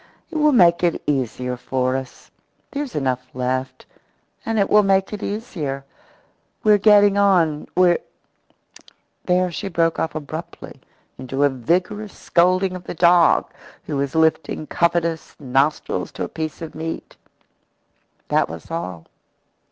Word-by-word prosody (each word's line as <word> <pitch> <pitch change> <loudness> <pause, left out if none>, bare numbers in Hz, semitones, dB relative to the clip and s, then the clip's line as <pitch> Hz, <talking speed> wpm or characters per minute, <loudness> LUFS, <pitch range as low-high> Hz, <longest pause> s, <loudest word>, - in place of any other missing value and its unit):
It 325 - -3
will 300 0 +4
make 175 -9 +5
it 170 -2 +2
easier 125 -2 -1
for 130 +1 -1
us. 130 -1 -7 0.4
There's 285 -2 -4
enough 130 -3 -1
left 130 +1 -3 0.6
and 225 0 -2
it 200 - +3
will 210 - +5
make 195 0 +1
it 210 - -5
easier. 155 - -4 0.8
We're 210 -1 +5
getting 205 -1 +5
on 170 -7 +2
we're 180 -1 +4 0.7
" - - -25
There 180 0 +2
she 170 - -5
broke 165 -2 0
off 160 - -2
abruptly 155 +2 -8 0.4
into 135 +2 -2
a 145 - +5
vigorous 180 - -2
scolding 185 +2 +2
of 180 - -9
the - - -6
dog, 170 0 +4 0.3
who 150 - -4
was 140 +1 -2
lifting 160 -1 +1
covetous 170 0 -1
nostrils 135 +2 0
to - - -4
a - - -2
piece 160 0 -5
of 160 - -7
meat. 160 +1 -6 1.1
That - - +2
was 80 - -9
all. 95 - -5
165 Hz, 140 wpm, -21 LUFS, 135-190 Hz, 1.1 s, make